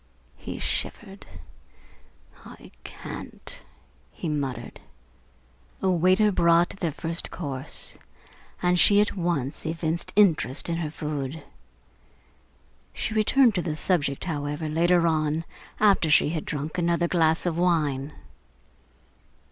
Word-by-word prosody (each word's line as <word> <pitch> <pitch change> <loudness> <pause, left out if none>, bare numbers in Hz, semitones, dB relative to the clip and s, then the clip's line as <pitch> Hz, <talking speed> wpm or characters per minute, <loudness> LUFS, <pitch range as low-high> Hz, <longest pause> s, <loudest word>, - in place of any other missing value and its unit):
He - - -7
shivered. - - -4 1.2
"I - - -13
can't!" - - -6 0.5
he 165 - -5
muttered. 135 -5 -4 1.0
A 190 - +1
waiter 185 +5 +4
brought 170 -1 +4
their 170 -4 -1
first 165 +3 -4
course, 140 -6 -3 0.6
and 180 0 +3
she 205 +3 +6
at 210 -1 +1
once 170 -7 -2
evinced 165 +1 -2
interest 165 - +3
in 165 - -1
her 165 -3 -2
food. 150 -1 -5 1.5
She 220 - -2
returned 225 +3 +4
to 180 - 0
the 160 -3 -3
subject, 155 -4 0
however, 150 -1 -3
later 170 +2 +3
on, 155 0 0 0.3
after 200 -6 +4
she 150 - +5
had 155 -1 -3
drunk 155 +4 -4
another 170 0 +1
glass 160 -1 +2
of 170 -1 -1
wine. 150 -6 +1
165 Hz, 115 wpm, -26 LUFS, 150-180 Hz, 1.5 s, she